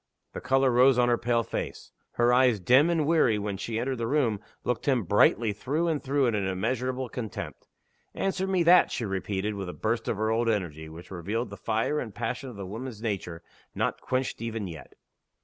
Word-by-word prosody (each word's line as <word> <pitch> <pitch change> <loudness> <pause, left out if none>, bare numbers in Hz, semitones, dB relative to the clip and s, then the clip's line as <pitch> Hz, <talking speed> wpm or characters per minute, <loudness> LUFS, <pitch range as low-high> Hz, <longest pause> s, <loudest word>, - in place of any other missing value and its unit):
The - - -6
color 135 0 +3
rose 125 +1 +5
on 120 0 +4
her 120 - +3
pale 120 0 +1
face. - - -5 0.2
Her 120 +1 +3
eyes, 125 -4 +4
dim 130 - +5
and 165 -3 +1
weary 150 -9 +3
when 100 -1 -3
she 110 +3 -4
entered 125 +1 -2
the 115 - -1
room, 120 -6 +1 0.2
looked 125 +2 -2
him 130 -5 +3
brightly 105 +3 +3
through 145 +11 -1
and 155 -4 -1
through 140 0 +1
in 120 - +1
immeasurable 125 +7 -1
contempt. 115 -3 -6 0.5
"Answer 190 0 -1
me 185 -2 +2
that!" 175 +2 +6
she 115 - -2
repeated, 95 +1 -2
with 100 -3 -5
a - - -6
burst 110 +1 -2
of 110 - -1
her 110 +1 0
old 115 +1 +1
energy 80 -7 -2
which 85 +4 -12
revealed 100 +7 -3
the - - -6
fire 115 +7 -1
and 110 -7 -6
passion 125 +3 -3
of 120 - -10
the 100 -1 -6
woman's 110 +3 -7
nature, 90 -6 -3 0.3
not - - -1
quenched 130 -2 -2
even 115 -2 -3
yet! 80 -4 -10
115 Hz, 200 wpm, -27 LUFS, 105-130 Hz, 0.5 s, that